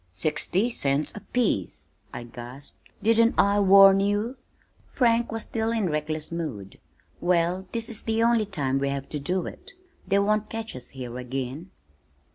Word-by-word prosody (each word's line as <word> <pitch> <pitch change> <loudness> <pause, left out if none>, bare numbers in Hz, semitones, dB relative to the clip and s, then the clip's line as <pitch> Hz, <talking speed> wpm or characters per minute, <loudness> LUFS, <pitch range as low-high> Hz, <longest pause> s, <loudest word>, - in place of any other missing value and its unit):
"Sixty 165 - 0
cents 140 -6 -1
apiece!" 210 - -1 0.3
I - - -6
gasped. 120 +4 -10 0.2
"Didn't 230 +1 +4
I 200 +1 +4
warn 195 0 +7
you?" 205 +5 0 0.6
Frank 235 -2 +2
was 225 -1 -2
still 225 0 -2
in 215 -7 0
reckless 150 +1 -3
mood. 135 - -5 0.4
"Well, 175 +1 +1
this 230 -1 -3
is 225 - -5
the 225 0 0
only 230 -2 +3
time 140 -9 -1
we 140 0 0
have 140 0 -4
to 150 - -4
do 180 +5 -1
it. 395 +2 -10 0.3
They 195 +1 +3
won't 210 +1 +1
catch 225 -5 -5
us 125 - -7
here 125 -2 -7
again." 130 +6 -5
185 Hz, 155 wpm, -26 LUFS, 140-220 Hz, 0.6 s, warn